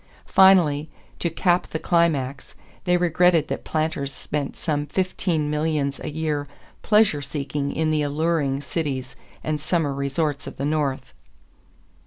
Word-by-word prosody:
Finally, 165 -6 +5 0.3
to 170 - 0
cap 175 +2 +1
the - - -3
climax, 150 -6 0 0.3
they 180 0 +3
regretted 175 -2 +3
that - - -3
planters 155 -3 -2
spent 145 0 -4
some 145 -2 -2
fifteen 180 -4 -1
millions 150 -2 -1
a - - -3
year 150 -1 -2 0.3
pleasure 210 -9 +3
seeking 140 0 -3
in 160 0 0
the 155 -1 +1
alluring 145 -1 0
cities 135 -4 -3 0.3
and 155 -1 -1
summer 155 -2 0
resorts 140 +1 -2
of - - -8
the 140 - -2
North. 145 - -1
150 Hz, 135 wpm, -23 LUFS, 140-165 Hz, 0.3 s, Finally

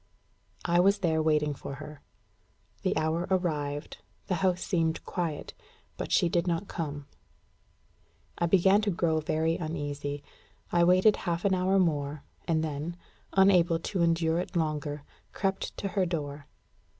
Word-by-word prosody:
I 175 0 +3
was 200 +3 +5
there 160 -1 +2
waiting 150 -1 +2
for 140 0 -7
her. 150 0 -10 0.8
The - - 0
hour 160 +2 0
arrived; 150 -6 -1 0.3
the - - -1
house 185 -1 +2
seemed 165 -4 0
quiet; 170 -5 -3 0.4
but - - -5
she - - +4
did 170 +1 0
not 170 +3 -1
come. 145 -5 -4 1.3
I 170 - +2
began 195 +3 +5
to 210 - 0
grow 170 -3 +1
very 160 +1 0
uneasy. 145 -3 -4 0.5
I 175 0 +4
waited 185 +4 +5
half 170 -1 -2
an 195 - +3
hour 185 +1 +2
more, 150 -5 0 0.2
and 160 -2 +2
then, 155 +3 -4 0.4
unable 185 -4 +5
to 175 +2 -3
endure 165 0 +2
it 180 - -5
longer, 150 -3 -1 0.3
crept 195 0 -2
to 200 - -3
her 190 -1 +1
door. 145 -4 -4
165 Hz, 145 wpm, -29 LUFS, 150-180 Hz, 1.3 s, was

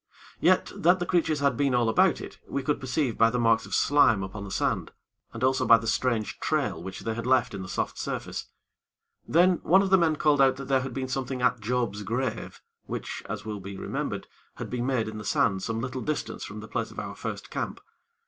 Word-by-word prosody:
Yet, - - +3
that 175 +3 +4
the 175 - -2
creatures 160 -4 +1
had 140 -3 +2
been 135 0 +1
all 120 -1 +2
about 110 - +3
it, - - -9
we 140 - -3
could 145 +3 0
perceive 130 -1 -1
by 115 - +6
the 125 - -1
marks 115 -1 +2
of - - -2
slime 115 -9 +4
upon 100 +2 -6
the 100 - -7
sand, 95 - -1 0.4
and 115 - -6
also 130 +1 +3
by 115 - +7
the 115 - -7
strange 115 -1 0
trail 145 - -1
which 95 +2 -7
they 115 - -2
had 115 +2 -4
left 130 -4 +3
in 100 - -5
the 90 - -7
soft - - -2
surface. - - -4 0.8
Then 175 +2 +4
one 190 +2 +5
of 190 - -2
the 190 - +7
men 160 -2 +3
called 150 -2 +3
out 135 -1 +5
that 135 -1 -8
there 135 -1 +3
had 130 -1 -6
been 130 -1 -2
something 130 -1 -3
at 125 -1 +3
Job's 115 -2 -1
grave, 115 +3 -3 0.2
which, - - -5
as - - -5
will 105 -2 -4
be 100 0 -8
remembered, - - -3 0.3
had - - -7
been 125 0 -2
made 125 -5 0
in 110 0 -6
the - - -7
sand 95 -1 +1
some 115 +3 -2
little 130 0 -4
distance 155 +2 -3
from - - -8
the - - -9
place - - -2
of - - -14
our - - -5
first - - -6
camp. - - -3
125 Hz, 230 wpm, -27 LUFS, 110-140 Hz, 0.8 s, by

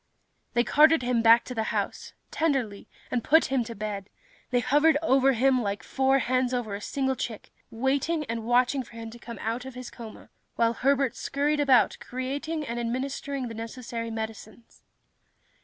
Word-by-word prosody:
They 240 - +4
carted 310 +2 +5
him 245 -1 +1
back 230 +1 +6
to 250 - -6
the 220 -2 -2
house, - - -3 0.2
tenderly, 265 -11 -1 0.2
and 240 -2 0
put 320 +2 +5
him 265 -3 +2
to 230 0 -7
bed. 205 -1 -5 0.4
They 245 - +2
hovered 290 +5 +4
over 270 -2 +4
him 255 +1 +3
like 205 0 -3
four 270 0 +2
hens 255 -1 +1
over 230 -4 -3
a 200 - -5
single 265 +3 -1
chick, 225 -4 -6 0.2
waiting 275 +6 0
and 230 -2 -4
watching 250 +3 +2
for 240 - -13
him 225 -1 -8
to 240 - -12
come 235 -2 -9
out 230 +3 -2
of 265 -1 -9
his 250 -1 -8
coma, 225 -2 -11 0.2
while 230 0 +2
Herbert 275 +1 +1
scurried 295 +2 -1
about 270 -4 +4
creating 285 +5 -4
and 235 -2 -4
administering 260 +2 -3
the 230 - -7
necessary 230 +1 -6
medicines. 220 0 -8
250 Hz, 175 wpm, -27 LUFS, 230-270 Hz, 0.4 s, back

